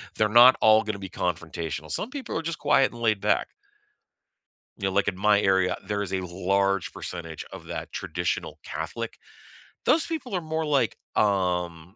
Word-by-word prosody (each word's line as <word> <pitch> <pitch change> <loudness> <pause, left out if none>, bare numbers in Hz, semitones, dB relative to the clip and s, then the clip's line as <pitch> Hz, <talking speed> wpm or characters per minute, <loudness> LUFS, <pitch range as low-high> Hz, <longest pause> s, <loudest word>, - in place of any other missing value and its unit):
they're 105 -1 +2
not 120 +3 +8
all 110 0 +6
gonna 105 -1 -3
be 95 -1 -7
confrontational; 80 -3 -4
some 215 - -3
people 265 - -4
are - - -1
just 165 -1 -4
quiet 145 -2 +3
and 120 - -10
laid-back. 110 -3 +1 1.3
You 100 - -4
know, - - -4
like 100 0 +2
in 95 -2 -1
my 105 0 +4
area, 95 -1 +2
there 100 0 -2
is 100 - -4
a 95 - 0
large 95 +1 0
percentage 85 -3 -7
of - - -10
that - - -6
traditional 85 +1 -3
Catholic. - - -5 0.7
Those 320 - +3
people 310 -9 -5
are 180 - 0
more 160 0 -2
like, 140 -6 +1 0.2
um 90 -3 0
100 Hz, 170 wpm, -26 LUFS, 90-120 Hz, 1.3 s, not